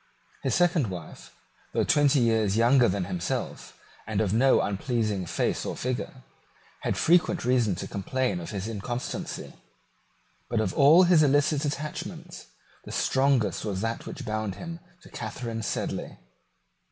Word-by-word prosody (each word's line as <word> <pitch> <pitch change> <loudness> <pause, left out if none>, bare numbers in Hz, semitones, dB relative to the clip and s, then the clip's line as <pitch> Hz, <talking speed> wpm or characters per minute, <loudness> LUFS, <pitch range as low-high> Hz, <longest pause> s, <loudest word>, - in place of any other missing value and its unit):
His - - 0
second 175 -7 +3
wife, 90 -3 -9 0.4
though - - +3
twenty 145 -2 +4
years 110 -3 +2
younger 120 +2 +5
than 95 0 -1
himself, 90 -2 -4 0.3
and 110 -3 -1
of 105 -3 +1
no 130 +4 +4
unpleasing 105 -2 -1
face - - -1
or - - -4
figure, 130 +1 -4 0.6
had - - -1
frequent 175 -2 +3
reason 120 -6 +2
to - - -5
complain 125 +2 -2
of 85 - -7
his 100 -1 -4
inconstancy. 115 +3 -5 1.0
But 115 - 0
of 110 - 0
all 155 +5 +7
his 175 -3 +5
illicit 145 +1 +3
attachments 150 +1 -5 0.4
the - - -9
strongest 130 -8 +1
was 100 -3 -3
that 115 +1 -3
which - - -7
bound 110 -2 -2
him 170 -1 -7 0.2
to - - -14
Catharine 115 -3 -5
Sedley. - - -3
120 Hz, 140 wpm, -27 LUFS, 105-140 Hz, 1.0 s, all